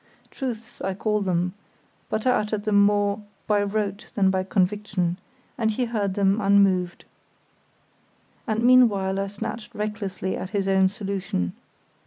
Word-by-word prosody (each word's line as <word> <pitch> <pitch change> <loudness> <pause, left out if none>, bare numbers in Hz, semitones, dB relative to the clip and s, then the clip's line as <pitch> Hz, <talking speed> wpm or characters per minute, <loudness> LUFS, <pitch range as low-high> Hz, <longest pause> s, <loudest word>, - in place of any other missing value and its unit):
Truths 240 -3 -6
I 190 0 -2
call 210 +1 0
them, 180 -2 0 0.6
but 215 +2 -2
I 255 - +5
uttered 210 -3 0
them 205 -2 +4
more 205 0 +2 0.2
by 210 -1 +2
rote 205 0 -2
than 190 -2 +3
by 190 0 +1
conviction, 190 -2 0 0.4
and 220 -1 +2
he 245 +3 0
heard 205 -5 -1
them 200 +2 +2
unmoved. 195 -3 +3 1.4
And 220 0 0
meanwhile 210 -7 +4
I 195 - -1
snatched 205 +3 -6
recklessly 205 -3 -3
at 185 - -5
his 200 -1 -1
own 190 -1 +4
solution. 190 - -3
200 Hz, 140 wpm, -24 LUFS, 190-215 Hz, 1.4 s, I